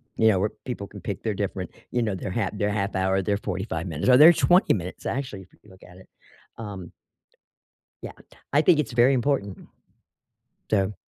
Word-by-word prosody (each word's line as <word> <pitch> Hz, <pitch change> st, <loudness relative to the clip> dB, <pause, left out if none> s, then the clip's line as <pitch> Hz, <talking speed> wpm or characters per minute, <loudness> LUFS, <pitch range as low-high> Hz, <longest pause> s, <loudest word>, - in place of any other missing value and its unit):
you 110 Hz, -, +3 dB
know, 95 Hz, -, +2 dB
where 105 Hz, +3 st, 0 dB, 0.2 s
people 110 Hz, -6 st, -5 dB
can 100 Hz, -, -12 dB
pick 100 Hz, -3 st, -5 dB
their 110 Hz, -2 st, -1 dB
different, 95 Hz, -3 st, -4 dB, 0.2 s
you 125 Hz, -, 0 dB
know, 105 Hz, -4 st, -1 dB
their 95 Hz, 0 st, -5 dB
half 105 Hz, -1 st, -1 dB
their 105 Hz, +1 st, 0 dB
1/2 100 Hz, -1 st, -2 dB
hour, 95 Hz, +1 st, +1 dB
their 100 Hz, +2 st, 0 dB
45 95 Hz, -3 st, -4 dB
minutes, 80 Hz, -, -3 dB
or 125 Hz, -, +7 dB
their 160 Hz, +4 st, +9 dB
20 180 Hz, +4 st, +4 dB
minutes, 90 Hz, -2 st, -6 dB
actually, 130 Hz, -8 st, -4 dB
if 90 Hz, -, -17 dB
you 105 Hz, -, -19 dB
look 95 Hz, 0 st, -17 dB
at 90 Hz, +1 st, -15 dB
it. 95 Hz, -, -16 dB, 0.5 s
Um 100 Hz, -6 st, -8 dB, 1.1 s
Yeah, -, -, -6 dB, 0.4 s
I 145 Hz, -, +5 dB
think 160 Hz, -1 st, +4 dB
it's 135 Hz, -, -1 dB
very 120 Hz, +3 st, +4 dB
important. 120 Hz, -6 st, -1 dB, 1.0 s
So 100 Hz, -1 st, +1 dB
100 Hz, 195 wpm, -25 LUFS, 95-120 Hz, 1.1 s, their